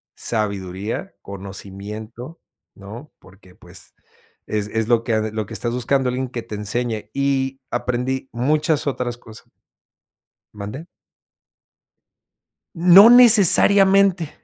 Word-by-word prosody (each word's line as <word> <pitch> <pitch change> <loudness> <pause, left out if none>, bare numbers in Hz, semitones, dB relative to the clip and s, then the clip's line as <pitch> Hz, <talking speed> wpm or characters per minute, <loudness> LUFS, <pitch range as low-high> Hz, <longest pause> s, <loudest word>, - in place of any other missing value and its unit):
sabiduría, 100 -2 -5
conocimiento, 100 - -10 0.4
¿no? 110 +9 -12
Porque 95 0 -20
pues, - - -14 0.5
es 105 -1 -3
es 110 0 -2
lo 115 -1 +1
que 110 -2 -2
lo 110 0 -4
que - - -10
estás 120 -1 -4
buscando, 125 +1 -1
alguien 130 +1 -4
que 120 -1 -6
te 115 -2 -8
enseñe. 110 +2 -4
Y 135 -1 -2
aprendí 125 +2 -3
muchas 150 +5 0
otras 125 -3 -3
cosas 110 -2 -16 1.0
¿Mande? 105 +10 -8 1.9
No 180 +5 +7
necesariamente. 195 -6 +5
120 Hz, 105 wpm, -20 LUFS, 105-140 Hz, 1.9 s, No